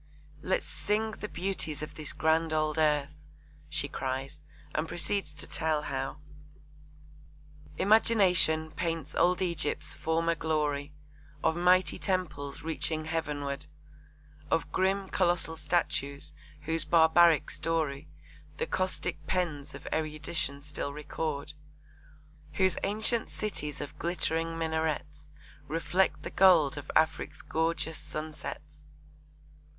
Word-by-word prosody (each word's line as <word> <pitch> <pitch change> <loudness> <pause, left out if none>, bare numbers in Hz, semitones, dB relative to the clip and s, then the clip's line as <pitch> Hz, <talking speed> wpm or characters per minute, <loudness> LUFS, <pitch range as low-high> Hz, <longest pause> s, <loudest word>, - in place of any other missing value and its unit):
Let's 185 - 0
sing 220 +2 -1
the 210 - -6
beauties 160 -6 -2
of 155 - -6
this 155 -2 -4
grand 160 0 +2
old 155 0 +1
earth, 150 -2 +2 0.6
she 150 -1 -1
cries, 135 0 -4 0.3
and 155 +1 0
proceeds 175 -1 -1
to 140 - -6
tell 155 -2 -1
how 135 0 -3 1.6
Imagination 185 -7 +4
paints 165 -4 -3
old 180 +1 +3
Egypt's 170 -4 -1
former 165 +1 +1
glory, 150 -3 -1 0.5
Of 160 - +3
mighty 180 +1 +3
temples 155 -7 -2
reaching 160 -1 -1
heavenward, 150 -3 -2 0.8
Of 165 - 0
grim, 190 +1 +1
colossal 175 -3 +2
statues, 145 -3 -1 0.3
whose 160 +2 +1
barbaric 165 -1 +5
story 155 -3 -1 0.5
The 475 - 0
caustic 185 - -2
pens 155 -5 -1
of - - -10
erudition 155 -2 -2
still 150 -1 -4
record, 150 0 -4 1.0
Whose 185 +2 +2
ancient 220 +3 +1
cities 150 -8 -4
of 150 +1 -7
glittering 165 -1 0
minarets 160 -2 -2 0.4
Reflect 175 +4 +1
the - - -5
gold 175 -7 +6
of 145 0 -8
Afric's 160 -1 +1
gorgeous 160 -1 -1
sunsets. 150 -1 -7
160 Hz, 110 wpm, -30 LUFS, 150-175 Hz, 1.6 s, gold